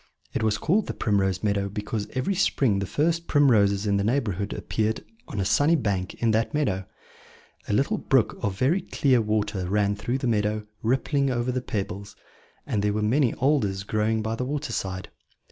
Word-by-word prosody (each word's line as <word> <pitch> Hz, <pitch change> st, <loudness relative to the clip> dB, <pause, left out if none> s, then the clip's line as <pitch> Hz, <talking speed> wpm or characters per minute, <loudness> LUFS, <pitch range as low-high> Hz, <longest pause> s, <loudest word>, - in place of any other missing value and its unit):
It -, -, -1 dB
was 110 Hz, -1 st, +1 dB
called 195 Hz, +6 st, +1 dB
the -, -, -4 dB
Primrose 95 Hz, -3 st, 0 dB
Meadow 100 Hz, -1 st, 0 dB
because 105 Hz, +1 st, -4 dB
every 130 Hz, +9 st, 0 dB
spring 135 Hz, -, +2 dB
the 100 Hz, -, -3 dB
first 165 Hz, -, 0 dB
primroses 105 Hz, -8 st, +4 dB
in 100 Hz, -1 st, +2 dB
the 100 Hz, -, 0 dB
neighbourhood 105 Hz, -4 st, 0 dB
appeared 110 Hz, 0 st, -2 dB, 0.2 s
on 105 Hz, -, -5 dB
a 95 Hz, -, 0 dB
sunny 145 Hz, -, +4 dB
bank 100 Hz, -, -1 dB
in 115 Hz, -1 st, +1 dB
that 110 Hz, +6 st, 0 dB
meadow. 100 Hz, -11 st, 0 dB, 0.8 s
A -, -, -1 dB
little -, -, +1 dB
brook -, -, +2 dB
of 95 Hz, -2 st, -1 dB
very 160 Hz, -, +2 dB
clear 130 Hz, -7 st, +2 dB
water 105 Hz, -4 st, -1 dB
ran 100 Hz, 0 st, +2 dB
through 120 Hz, +5 st, -2 dB
the 135 Hz, -, -4 dB
meadow, 105 Hz, -2 st, 0 dB, 0.2 s
rippling 135 Hz, +4 st, +1 dB
over 125 Hz, 0 st, 0 dB
the 130 Hz, 0 st, -1 dB
pebbles; 100 Hz, -3 st, -4 dB, 0.5 s
and 105 Hz, -, -1 dB
there 105 Hz, 0 st, +1 dB
were 105 Hz, 0 st, -1 dB
many 125 Hz, +4 st, +2 dB
alders 110 Hz, -9 st, +1 dB
growing 110 Hz, +2 st, 0 dB
by 110 Hz, +1 st, -2 dB
the 115 Hz, -, -2 dB
water 145 Hz, +2 st, -3 dB
side. 95 Hz, -1 st, -4 dB
110 Hz, 185 wpm, -25 LUFS, 100-130 Hz, 0.8 s, primroses